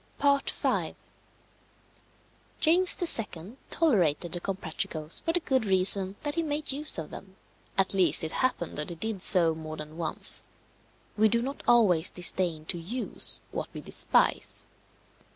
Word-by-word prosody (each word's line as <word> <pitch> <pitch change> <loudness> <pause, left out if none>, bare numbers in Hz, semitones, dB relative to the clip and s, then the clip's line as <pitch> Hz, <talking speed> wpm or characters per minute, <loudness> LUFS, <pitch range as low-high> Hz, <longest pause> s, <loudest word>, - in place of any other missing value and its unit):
V. 280 -1 -1 1.7
James 350 -2 +4 0.2
II. 185 +10 -13
tolerated 180 - 0
the 175 - -3
Comprachicos 160 -4 -4
for 330 - -2
the 350 - -1
good 260 -5 -1
reason 190 0 +5
that 290 -1 -2
he 335 - -2
made 300 -2 -3
use 295 +3 -1
of 160 -2 -8
them; 190 -1 -12 0.4
at 195 0 +1
least 175 -6 +3
it 160 - -3
happened 250 - -3
that 150 - -3
he 170 - -7
did 210 +2 -6
so 170 -4 +7
more 155 0 -9
than 155 +1 -10
once. 160 -2 0 0.7
We 220 +1 +2
do 235 +2 -1
not 275 +3 -7
always 195 -9 +3
disdain 175 -3 -2
to 175 +1 -3
use 225 +10 0
what - - -6
we - - -7
despise. - - 0
190 Hz, 145 wpm, -26 LUFS, 165-260 Hz, 1.7 s, so